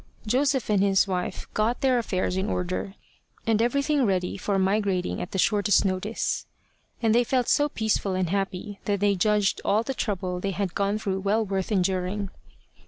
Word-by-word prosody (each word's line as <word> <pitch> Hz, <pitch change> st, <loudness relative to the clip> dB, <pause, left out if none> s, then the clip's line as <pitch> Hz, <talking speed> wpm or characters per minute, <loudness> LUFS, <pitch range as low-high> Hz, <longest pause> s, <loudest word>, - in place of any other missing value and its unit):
Joseph 265 Hz, +3 st, +1 dB
and 200 Hz, -2 st, +3 dB
his 195 Hz, 0 st, +3 dB
wife 180 Hz, -2 st, -3 dB
got 220 Hz, +3 st, 0 dB
their 255 Hz, -2 st, +3 dB
affairs 185 Hz, -5 st, -1 dB
in 190 Hz, +3 st, -1 dB
order, 185 Hz, +2 st, -3 dB, 0.5 s
and 225 Hz, -1 st, +2 dB
everything 280 Hz, +4 st, +2 dB
ready 185 Hz, -5 st, 0 dB
for 200 Hz, 0 st, -1 dB
migrating 190 Hz, -1 st, 0 dB
at 180 Hz, -, -5 dB
the -, -, -4 dB
shortest 205 Hz, +1 st, +3 dB
notice; 195 Hz, +4 st, -1 dB, 0.6 s
and 220 Hz, -1 st, +4 dB
they 240 Hz, +1 st, +4 dB
felt 250 Hz, 0 st, 0 dB
so 290 Hz, 0 st, +3 dB
peaceful 215 Hz, -5 st, 0 dB
and 185 Hz, -2 st, -1 dB
happy 195 Hz, +1 st, -3 dB
that 200 Hz, -1 st, 0 dB
they 205 Hz, 0 st, +3 dB
judged 205 Hz, +1 st, +1 dB
all 215 Hz, +3 st, +2 dB
the 270 Hz, -, -3 dB
trouble 185 Hz, -6 st, -2 dB
they 195 Hz, -, -2 dB
had 195 Hz, -4 st, -1 dB
gone 200 Hz, +1 st, 0 dB
through 195 Hz, -3 st, -2 dB
well 210 Hz, +3 st, +1 dB
worth 195 Hz, 0 st, -2 dB
enduring. 190 Hz, +1 st, 0 dB
200 Hz, 175 wpm, -26 LUFS, 190-220 Hz, 0.6 s, and